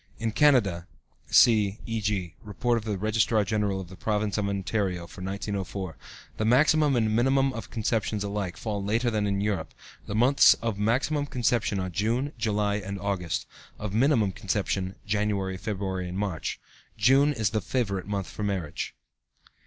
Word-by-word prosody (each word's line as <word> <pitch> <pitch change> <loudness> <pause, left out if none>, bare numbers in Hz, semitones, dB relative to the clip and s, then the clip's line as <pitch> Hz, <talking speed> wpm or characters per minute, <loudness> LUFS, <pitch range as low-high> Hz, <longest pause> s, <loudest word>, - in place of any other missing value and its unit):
In 115 -1 -2
Canada 105 - +3 0.4
(see 105 -4 +5
e.g., 105 -7 -2
Report 120 +3 -1
of 115 -2 -3
the 105 -3 -2
Registrar 110 +1 +2
General 105 -2 0
of 95 - -7
the 95 - -11
Province 105 +1 -1
of 105 -2 0
Ontario 95 -2 -1
for 90 - -12
1904), 95 -2 -4 0.4
the - - -1
maximum 145 +5 +4
and 110 -2 +1
minimum 135 +3 +3
of 115 -4 -7
conceptions 110 -2 -1
alike 100 -3 -3
fall 105 -3 -3
later 115 +4 +1
than 105 -2 0
in 100 0 0
Europe; 100 -7 -2 0.3
the 105 - -3
months 130 +5 +6
of 115 -3 -3
maximum 135 +7 +1
conception 120 -5 0
are 95 0 -2
June, 120 - -1
July, 105 -2 +1
and 100 -1 -5
August; 90 -6 -2 0.3
of 105 -2 -5
minimum 115 -4 +3
conception, 95 0 -2
January, 100 -2 -1
February, 95 -2 -3
and 90 - -5
March. 100 -5 -3 0.4
June 135 +7 +5
is 110 -7 0
the 110 - 0
favorite 100 -8 -2
month 100 -2 -2
for - - -9
marriage. 95 -7 -3
105 Hz, 160 wpm, -27 LUFS, 95-115 Hz, 0.4 s, months